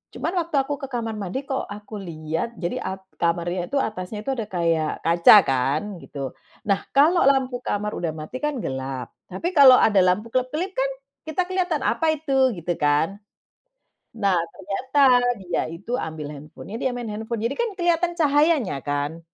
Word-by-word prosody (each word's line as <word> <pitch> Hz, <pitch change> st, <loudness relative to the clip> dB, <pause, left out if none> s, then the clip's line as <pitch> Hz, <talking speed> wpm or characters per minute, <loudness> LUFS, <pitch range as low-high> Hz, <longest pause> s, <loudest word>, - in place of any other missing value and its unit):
cuman 335 Hz, -, -2 dB
waktu 335 Hz, -3 st, -3 dB
aku 290 Hz, -, -3 dB
ke 275 Hz, -, -4 dB
kamar 230 Hz, -3 st, -3 dB
mandi, 200 Hz, +7 st, -4 dB
kok 265 Hz, -1 st, -3 dB
aku 210 Hz, +1 st, -9 dB
liat 165 Hz, +5 st, -4 dB
jadi 175 Hz, -1 st, -3 dB
ak 190 Hz, 0 st, -4 dB, 0.2 s
kamarnya 175 Hz, +1 st, 0 dB
itu 280 Hz, -, -4 dB
atasnya 210 Hz, -4 st, -3 dB
itu, 270 Hz, -, 0 dB
ada 225 Hz, -3 st, -4 dB
kayak 165 Hz, -4 st, +1 dB
kaca 170 Hz, +4 st, +7 dB
kan, 135 Hz, +3 st, +1 dB, 0.2 s
gitu. 135 Hz, -2 st, -6 dB, 0.3 s
Nah, 200 Hz, -1 st, +3 dB, 0.2 s
kalau 325 Hz, +5 st, +5 dB
lampu 260 Hz, -2 st, +1 dB
kamar 210 Hz, +1 st, -1 dB
udah 170 Hz, -2 st, -1 dB
mati, 155 Hz, +10 st, -6 dB
kan 295 Hz, -2 st, 0 dB
gelap. 130 Hz, -2 st, -4 dB, 0.2 s
Tapi 340 Hz, -, -3 dB
kalau 265 Hz, -3 st, +9 dB
ada 205 Hz, -3 st, +4 dB
lampu 185 Hz, +5 st, +1 dB
kelap-kelip, 300 Hz, +9 st, -1 dB
kan, -, -, 0 dB, 0.4 s
kita 315 Hz, +4 st, 0 dB
kelihatan, 360 Hz, -5 st, -1 dB
"Apa 320 Hz, -1 st, +2 dB
itu?", 270 Hz, -4 st, +2 dB
gitu 170 Hz, +1 st, -2 dB
kan. 150 Hz, +6 st, +2 dB, 1.0 s
Nah, 200 Hz, -4 st, +2 dB, 0.2 s
ternyata, 255 Hz, +9 st, -1 dB, 0.4 s
dia 175 Hz, -1 st, -1 dB
itu 175 Hz, +8 st, -8 dB
ambil 160 Hz, -, -5 dB
handphone-nya, 150 Hz, +8 st, -9 dB
dia 260 Hz, -, +1 dB
main 240 Hz, -2 st, -5 dB
handphone. 220 Hz, +1 st, -4 dB
Jadi 245 Hz, -, 0 dB
kan 475 Hz, -1 st, 0 dB
kelihatan 345 Hz, 0 st, +2 dB
cahayanya, 295 Hz, -, +3 dB
kan, 145 Hz, +3 st, -2 dB
210 Hz, 170 wpm, -23 LUFS, 170-275 Hz, 1.0 s, kalau